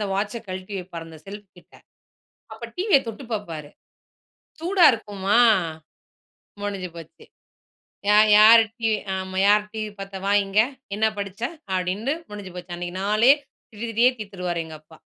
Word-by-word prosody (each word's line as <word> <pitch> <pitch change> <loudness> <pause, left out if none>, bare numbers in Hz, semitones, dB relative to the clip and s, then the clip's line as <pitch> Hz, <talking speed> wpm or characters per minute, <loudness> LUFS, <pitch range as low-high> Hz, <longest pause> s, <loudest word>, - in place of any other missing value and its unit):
அந்த 205 - -2
வாட்ச்ச 205 +3 -2
கழட்டி 185 +2 -6
வைப்பாரு 170 -2 -8
அந்த 160 -1 -12
செல்ஃப் 205 +1 -9
கிட்ட, 175 - -21 0.8
அப்ப 220 +2 -8
டிவிய 375 -5 +4
தொட்டுப் 230 +2 -8
பாப்பாரு. 165 -8 -5 0.9
சூடா 360 +2 +2
இருக்குமா? 205 -1 0 1.2
முடிஞ்சு 195 -3 -4
போச்சு! 165 -1 -12 0.9
"யார் 215 +1 +6
யார்? 225 +2 +9 0.2
டிவி 225 -2 +1 0.2
ஆமா, 190 0 -5
யார் 210 +1 +4
டிவி 215 -1 -4
பாத்தா? 195 0 -7
வா 200 - +2
இங்க! 195 +2 +1 0.4
என்ன 220 - +2
படிச்ச? 200 +1 -6 0.3
அப்படின்னு 185 +8 -1 0.2
முடிஞ்சு 200 -3 -8
போச்சு. 175 0 -8
அன்னைக்கு 175 +1 -5
நாளே 215 +6 +5 0.4
திட்டி 220 +1 -6
திட்டியே 235 +3 +4
தீத்துருவாரு" 180 -5 -4
எங்க 160 -1 -10
அப்பா. 160 +1 -18
205 Hz, 145 wpm, -23 LUFS, 185-220 Hz, 1.2 s, யார்